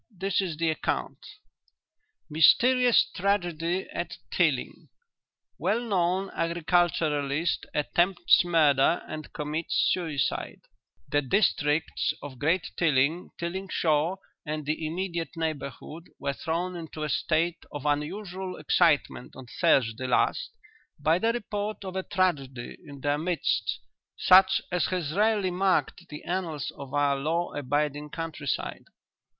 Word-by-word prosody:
This 195 Hz, -2 st, -1 dB
is 175 Hz, -5 st, -3 dB
the 165 Hz, 0 st, +1 dB
account: 155 Hz, -, -3 dB, 1.1 s
"'MYSTERIOUS 245 Hz, -, +5 dB
TRAGEDY 175 Hz, -2 st, -1 dB
AT -, -, -4 dB
TILLING -, -, 0 dB, 0.7 s
"'WELL 210 Hz, +5 st, +1 dB
KNOWN 190 Hz, -4 st, 0 dB
AGRICULTURALIST 165 Hz, -3 st, 0 dB
ATTEMPTS 175 Hz, +5 st, +3 dB
MURDER 160 Hz, -3 st, +3 dB
AND 155 Hz, 0 st, -7 dB
COMMITS 150 Hz, +2 st, 0 dB
SUICIDE 155 Hz, -9 st, -2 dB, 0.5 s
"'The 145 Hz, -, +1 dB
districts 150 Hz, -, +1 dB
of 135 Hz, -3 st, -8 dB
Great 165 Hz, +4 st, +1 dB
Tilling, 155 Hz, +1 st, +2 dB
Tilling 185 Hz, +3 st, -4 dB
Shaw 160 Hz, +2 st, +1 dB, 0.3 s
and 155 Hz, -1 st, -4 dB
the 155 Hz, +1 st, -2 dB
immediate 170 Hz, 0 st, -4 dB
neighbourhood 160 Hz, +1 st, -5 dB
were 140 Hz, -, -2 dB
thrown 175 Hz, +5 st, -3 dB
into 160 Hz, -2 st, -6 dB
a -, -, -1 dB
state 165 Hz, +4 st, 0 dB
of 145 Hz, -1 st, -7 dB
unusual 185 Hz, +5 st, -2 dB
excitement 155 Hz, -7 st, +1 dB
on 130 Hz, -, -10 dB
Thursday 130 Hz, -7 st, +2 dB
last 125 Hz, -, +1 dB, 0.5 s
by 160 Hz, +4 st, +2 dB
the 225 Hz, +4 st, +2 dB
report 210 Hz, -3 st, -4 dB
of 185 Hz, 0 st, -6 dB
a 190 Hz, -, 0 dB
tragedy 145 Hz, -11 st, -1 dB
in 140 Hz, -2 st, -10 dB
their 145 Hz, +1 st, 0 dB
midst 170 Hz, +1 st, 0 dB, 0.4 s
such 190 Hz, +1 st, +6 dB
as 180 Hz, 0 st, +1 dB
has 175 Hz, -5 st, -2 dB
rarely 205 Hz, -1 st, +2 dB
marked 180 Hz, -1 st, 0 dB
the 150 Hz, -, -8 dB
annals 170 Hz, -5 st, -3 dB
of 140 Hz, -2 st, -9 dB
our 145 Hz, -1 st, +2 dB
law 165 Hz, +5 st, -1 dB
abiding 145 Hz, +1 st, -1 dB
country 160 Hz, -2 st, -6 dB
side. -, -, -3 dB
165 Hz, 120 wpm, -27 LUFS, 150-185 Hz, 1.1 s, such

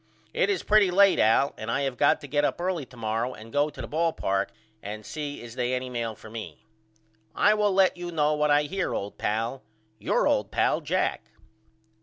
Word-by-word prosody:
It 195 Hz, -, +1 dB
is 195 Hz, -4 st, 0 dB
pretty 210 Hz, -2 st, +4 dB
late 195 Hz, +2 st, +5 dB
Al 115 Hz, +6 st, +3 dB
and 110 Hz, -, -5 dB
I 135 Hz, +4 st, 0 dB
have 135 Hz, -2 st, -1 dB
got -, -, +3 dB
to 145 Hz, -, -8 dB
get 145 Hz, +1 st, +1 dB
up -, -, 0 dB
early 175 Hz, -6 st, -2 dB
to 125 Hz, -, -16 dB
morrow 115 Hz, +3 st, -2 dB
and 110 Hz, +1 st, -13 dB
go 145 Hz, +1 st, +2 dB
to 145 Hz, -, -9 dB
the -, -, -6 dB
ball 165 Hz, +1 st, 0 dB
park 95 Hz, 0 st, -1 dB, 0.3 s
and 105 Hz, +1 st, -7 dB
see 145 Hz, -3 st, -6 dB
is 115 Hz, -1 st, -9 dB
they 125 Hz, +1 st, -1 dB
any 125 Hz, 0 st, -4 dB
mail 115 Hz, -2 st, -3 dB
for 110 Hz, -, -13 dB
me. 110 Hz, 0 st, -9 dB, 0.7 s
I 210 Hz, -, +4 dB
will 210 Hz, -1 st, +2 dB
let 190 Hz, -1 st, +3 dB
you 175 Hz, 0 st, -5 dB
know 150 Hz, -2 st, +2 dB
what 150 Hz, 0 st, +1 dB
I 145 Hz, 0 st, +4 dB
hear 190 Hz, +6 st, -2 dB
old 100 Hz, +1 st, -5 dB
pal. 115 Hz, +5 st, -2 dB, 0.4 s
Your -, -, +1 dB
old -, -, +1 dB
pal, -, -, +1 dB
JACK. -, -, -1 dB
145 Hz, 215 wpm, -26 LUFS, 115-170 Hz, 0.7 s, late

